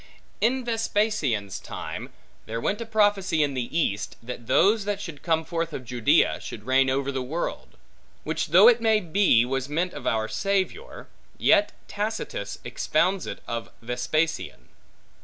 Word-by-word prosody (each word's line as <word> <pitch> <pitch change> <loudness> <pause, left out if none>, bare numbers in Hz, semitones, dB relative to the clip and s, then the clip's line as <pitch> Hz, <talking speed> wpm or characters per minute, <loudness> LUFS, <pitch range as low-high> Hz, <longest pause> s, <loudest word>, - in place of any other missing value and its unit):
In 250 +3 +1
Vespasian's 210 - 0
time, - - -7 0.4
there 115 +1 -3
went 205 - -1
a 230 - -5
prophecy 205 -7 +2
in 145 -1 -1
the 130 +4 -3
East, 105 -10 -1
that 120 -1 -7
those 210 +1 +4
that 205 -1 -2
should 165 -7 -8
come 160 -2 +1
forth 165 -1 -3
of 130 - -6
Judea, 120 -1 +2
should 105 - -8
reign 130 +1 +3
over 135 +1 0
the 130 -1 -2
world: 155 +7 -4 0.5
which - - -2
though - - +7
it 480 - +6
may 220 -1 +4
be 175 - +3
was 135 +1 -2
meant 170 +4 -1
of - - -6
our 110 -1 +1
Savior; 200 - -2 0.3
yet 205 +1 +4
Tacitus 205 - -4
expounds 170 +9 0
it - - -7
of 115 0 -4
Vespasian. 125 - -2
160 Hz, 155 wpm, -25 LUFS, 125-205 Hz, 0.5 s, though